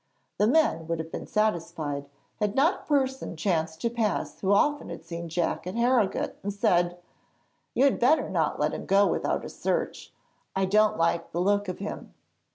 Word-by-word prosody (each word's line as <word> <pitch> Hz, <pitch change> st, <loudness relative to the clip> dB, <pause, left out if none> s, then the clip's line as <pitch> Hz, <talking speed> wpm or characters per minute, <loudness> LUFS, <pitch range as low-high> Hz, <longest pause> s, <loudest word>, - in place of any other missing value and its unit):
The 210 Hz, -, +4 dB
men 245 Hz, -, +2 dB
would 165 Hz, 0 st, -1 dB
have 160 Hz, 0 st, -6 dB
been -, -, -6 dB
satisfied 160 Hz, -9 st, -1 dB, 0.3 s
had 210 Hz, -1 st, -1 dB
not 300 Hz, +7 st, +3 dB
a -, -, -18 dB
person 265 Hz, -, 0 dB
chanced 160 Hz, -2 st, -1 dB
to 235 Hz, -, +1 dB
pass 225 Hz, -3 st, -1 dB
who 190 Hz, -, -2 dB
had 200 Hz, -, +6 dB
often 285 Hz, -11 st, 0 dB
seen 170 Hz, 0 st, -6 dB
Jack 170 Hz, +1 st, -1 dB
at 185 Hz, -, -4 dB
Harrogate, 235 Hz, -4 st, +1 dB
and 200 Hz, -, -3 dB
said: 175 Hz, -4 st, +1 dB, 0.8 s
'You 260 Hz, -, +3 dB
had 275 Hz, -, +3 dB
better 275 Hz, +3 st, +4 dB
not 165 Hz, -5 st, 0 dB
let 150 Hz, +1 st, +1 dB
him -, -, -6 dB
go 200 Hz, +1 st, +5 dB
without -, -, -1 dB
a -, -, -6 dB
search; -, -, -3 dB, 0.4 s
I 190 Hz, 0 st, +2 dB
don't 215 Hz, +3 st, +3 dB
like 165 Hz, 0 st, 0 dB
the 170 Hz, -, -2 dB
look 205 Hz, +2 st, +2 dB
of 185 Hz, -, -4 dB
him.' 200 Hz, -, -7 dB
195 Hz, 185 wpm, -27 LUFS, 170-230 Hz, 0.8 s, had